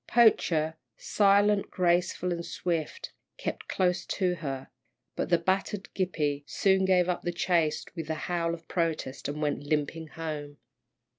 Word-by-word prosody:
Poacher, 165 -9 +4 0.2
silent, 205 0 +3
graceful, 180 0 +1
and 170 -1 -2
swift, 175 - -3 0.3
kept - - -4
close 180 -1 +1
to 185 -2 +1
her, 135 -4 -5 0.5
but - - -2
the 175 - +5
battered 190 +3 -1
Gippie 150 -6 0
soon 190 -1 +3
gave 180 -2 +4
up 180 -1 -1
the 175 - -2
chase 170 -3 +1
with 165 -2 -5
a 160 - 0
howl 170 -2 0
of 165 -1 -16
protest, 160 -6 -2
and 145 +1 -4
went 145 -1 0
limping 155 +2 -1
home. 150 -3 -6
170 Hz, 145 wpm, -29 LUFS, 155-185 Hz, 0.5 s, the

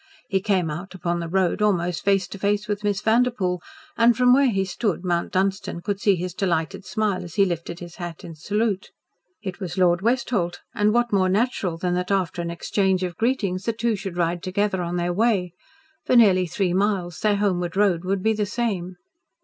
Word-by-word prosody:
He 195 -3 +1
came 185 -6 +1
out 180 +5 -7
upon 175 -1 -2
the 170 -1 -4
road 190 +2 +1
almost 180 -4 +1
face 195 -2 +2
to 200 - -8
face 205 +2 0
with 205 0 -3
Miss 205 -1 0
Vanderpoel, 220 -6 +1 0.3
and 235 0 +4
from 250 0 +5
where 275 0 +5
he 195 -3 0
stood 190 -1 -2
Mount 175 -1 0
Dunstan 190 -2 -1
could 200 +1 -3
see 200 -2 +4
his 180 0 -4
delighted 190 0 -1
smile 210 -2 -1
as 170 -2 -10
he 200 - +5
lifted 170 -1 -4
his 175 -1 -10
hat 175 -3 -7
in 165 - -8
salute. 200 +4 -1 0.5
It 190 -2 -5
was 185 -2 -5
Lord 175 -1 +3
Westholt, 225 -6 0
and 210 0 +2
what 240 0 +1
more 185 -2 +3
natural 195 -4 0
than 180 +1 -1
that 180 0 -1
after 185 -3 0
an 170 - -3
exchange 190 +2 0
of 180 -1 -3
greetings 205 -5 -1
the 230 - 0
two 230 0 0
should 190 -3 -6
ride 170 0 0
together 190 0 -1
on 175 0 -3
their 175 0 0
way! 195 -4 +1 0.5
For - - +3
nearly 190 -6 +5
three 180 +1 -1
miles 185 -3 0
their 210 -1 +2
homeward 185 -3 -1
road 190 -4 +2
would 190 0 -1
be 220 - +3
the 210 -1 -1
same. 200 -6 -2
190 Hz, 205 wpm, -23 LUFS, 175-210 Hz, 0.5 s, from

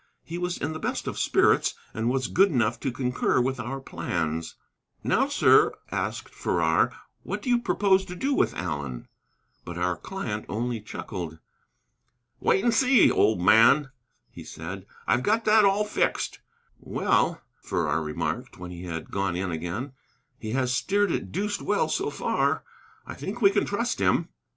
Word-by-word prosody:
He 170 +1 -6
was 180 0 -2
in 150 +2 -3
the 155 - -6
best - - -3
of - - -3
spirits, - - +3 0.2
and 115 +2 -1
was 130 0 0
good 195 +3 +4
enough 120 - +1
to 135 - -2
concur 125 0 0
with 130 +1 0
our 130 +4 -4
plans. 80 -9 -3 0.5
"Now, - - +2
sir," - - +4 0.2
asked - - -3
Farrar, 80 -2 +1 0.3
"what 205 +2 -5
do 250 - 0
you 240 - +4
propose 200 -5 +2
to 180 - -7
do 275 +9 0
with - - +1
Allen?" 70 -8 -4 0.6
But 85 0 -7
our 90 0 0
client 110 - -5
only 115 0 -2
chuckled. 90 -6 -6 1.0
"Wait 195 - +2
and 240 - +3
see, 255 +2 +5
old 105 -3 +3
man," 125 +9 +5 0.4
he - - -10
said; 90 +4 -8 0.2
"I've 115 +4 +2
got 220 - +1
that 215 -1 +6
all 200 +2 +3
fixed." - - -1 0.4
"Well," - - +1 0.2
Farrar 75 +2 -1
remarked, 75 -1 -4
when 90 0 -8
he 90 +1 -8
had 85 -2 -6
gone 95 -3 -1
in 90 0 -2
again, 85 - -4 0.5
"he 110 0 -5
has 130 -1 +1
steered 200 +8 +1
it - - -3
deuced 205 +3 -2
well 205 0 +1
so - - 0
far. - - 0 0.4
I - - -7
think 210 +5 -6
we 200 -4 +5
can - - +1
trust 235 +4 -1
him." - - +2
125 Hz, 165 wpm, -26 LUFS, -, 1.0 s, that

